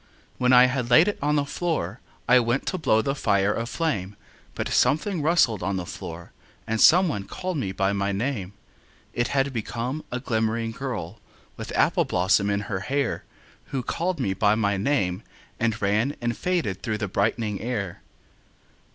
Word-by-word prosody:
When 125 0 +3
I 125 0 +8
had 130 -2 -1
laid 140 +10 +6
it 205 - -1
on 150 +1 +1
the 145 -1 +1
floor 140 - -2 0.3
I 125 +1 +7
went 120 +2 0
to 185 - -2
blow 110 -8 +2
the 135 - 0
fire 105 -6 +1
aflame, 115 - -2 0.4
But - - -2
something 170 +3 +2
rustled 145 - +3
on 95 +2 -1
the 90 - -4
floor, 85 0 -8 0.3
And 110 0 -1
some 180 +3 +7
one 100 -11 -3
called 185 - -4
me 100 -9 -2
by 95 +1 0
my 100 0 0
name: 100 -2 -3 0.6
It 120 - 0
had 135 0 0
become 120 +5 -3
a 125 - -2
glimmering 115 -2 -1
girl 130 0 -5 0.4
With - - -7
apple - - +3
blossom 95 +3 +2
in 100 0 0
her 100 -2 -3
hair 135 +5 -2 0.4
Who 130 -2 -4
called 175 +7 -2
me 95 - 0
by 105 +2 +3
my 100 -2 +1
name 95 -4 0 0.4
and 115 -1 0
ran 110 +8 +1
And 120 -1 -1
faded 130 - -1
through 110 -2 -2
the 105 -1 -3
brightening 105 +1 -1
air. 105 -7 -3
115 Hz, 175 wpm, -25 LUFS, 100-140 Hz, 0.6 s, I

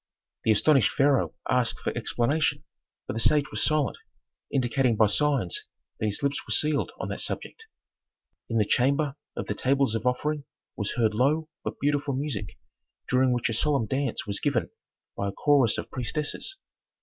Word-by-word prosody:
The 110 - +5
astonished 135 +2 +4
pharaoh 140 -1 +2
asked 125 -2 +1
for - - -3
explanation, 120 +6 0 0.4
but - - -4
the 115 - -3
sage 150 +4 +3
was - - -2
silent, 155 -3 +1 0.5
indicating 125 -2 +2
by 110 - +5
signs 130 - +1 0.4
that 110 - 0
his 105 +6 -2
lips 140 0 0
were - - -6
sealed 150 -2 +2
on - - -3
that - - -2
subject. 450 0 -4 0.8
In 115 - 0
the 105 - +3
chamber 140 +5 +2 0.2
of - - -3
the - - -2
"tables 135 -2 +1
of 115 +2 -1
offering" 145 +3 -1 0.3
was 105 -2 -2
heard 110 -3 +2
low 150 +7 +1
but - - -5
beautiful 145 -1 0
music, 130 -8 -4 0.5
during 130 0 +3
which 120 -1 +1
a 115 - -2
solemn 140 +1 +1
dance 135 +2 -2
was 100 0 -1
given - - 0 0.4
by 100 - -2
a - - -3
chorus 140 -1 +3
of - - -6
priestesses. 150 - -3
130 Hz, 170 wpm, -27 LUFS, 115-145 Hz, 0.8 s, The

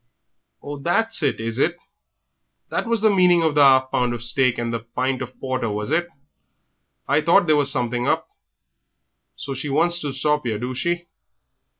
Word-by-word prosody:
"Ah, 145 0 -6
that's 225 +8 0
it, 140 -6 0
is 115 +2 -3
it? 170 +4 +1 0.9
That - - -2
was 230 -2 0
the 220 -1 +4
meaning 180 -2 +4
of 160 -2 +1
the 150 - +3
'alf 130 -1 +5
pound 125 -1 0
of 120 - -7
steak 125 +1 +1
and 120 0 -3
the 115 - -2
pint 125 +3 -3
of - - -8
porter, 130 -3 -2
was 105 +4 -4
it. 170 +2 +1 1.0
I 145 - +2
thought 170 +5 +4
there 155 -2 +3
was 145 -1 +3
something 125 -2 -1
hup. - - 0 1.1
So 140 - -6
she 135 +3 -5
wants 170 +5 +2
to 145 -4 -4
stop 150 +2 0
'ere, 110 -2 -1
do 125 +4 -4
she? 170 +6 -2
140 Hz, 185 wpm, -22 LUFS, 125-170 Hz, 1.1 s, alf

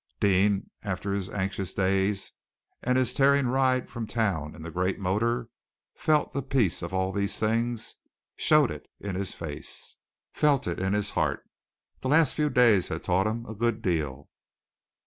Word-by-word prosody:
Deane, 100 0 +2
after 100 -1 -3
his 100 -2 -2
anxious 95 -1 -3
days 95 +1 +1 0.5
and 125 +1 +1
his 130 -1 +1
tearing 140 0 +4
ride 130 0 +2
from 115 -1 -5
town 95 -10 -1
in 80 - -10
the 85 - -6
great 90 +2 0
motor, 115 +5 0 0.5
felt 155 -1 +1
the 140 - -1
peace 130 -9 +1
of 85 0 -5
all 95 0 0
these 100 0 -1
things, 115 +1 -1 0.4
showed - - +4
it - - -8
in 100 -1 -4
his 95 +1 -3
face, 75 -3 -6 0.4
felt 145 -3 +2
it 85 - -2
in 95 +1 0
his 105 0 0
heart. - - -1 0.5
The 130 - -3
last 155 -1 +4
few 150 -1 +1
days 115 -8 +4
had 80 - -4
taught 95 +3 +2
him 115 +2 -3
a 110 - -7
good 115 +1 -1
deal. 75 -5 -1
100 Hz, 165 wpm, -27 LUFS, 95-120 Hz, 0.5 s, tearing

